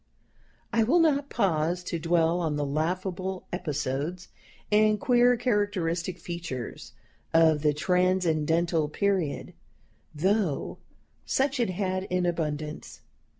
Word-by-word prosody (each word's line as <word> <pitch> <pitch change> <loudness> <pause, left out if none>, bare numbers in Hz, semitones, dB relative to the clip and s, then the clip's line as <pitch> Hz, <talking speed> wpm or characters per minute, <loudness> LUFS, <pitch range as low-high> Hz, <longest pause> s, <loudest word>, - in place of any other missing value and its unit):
I 230 - +3
will 260 +10 +3
not 290 -4 +2
pause 175 -4 0
to 170 -1 -3
dwell 165 +1 +2
on 160 -4 -1
the 145 0 -1
laughable 180 +5 -2
episodes 150 0 -3 0.4
and 215 0 +4
queer 245 0 +4
characteristic 200 -7 -1
features 165 -8 -6 0.4
of 160 -2 +5
the 150 0 +3
Transcendental 170 -1 +1
Period, 190 -3 -1 0.6
though 185 -1 0 0.5
such 270 0 +1
it 235 - +1
had 185 0 -2
in 180 -1 0
abundance. 155 -3 -3
180 Hz, 110 wpm, -27 LUFS, 160-200 Hz, 0.6 s, of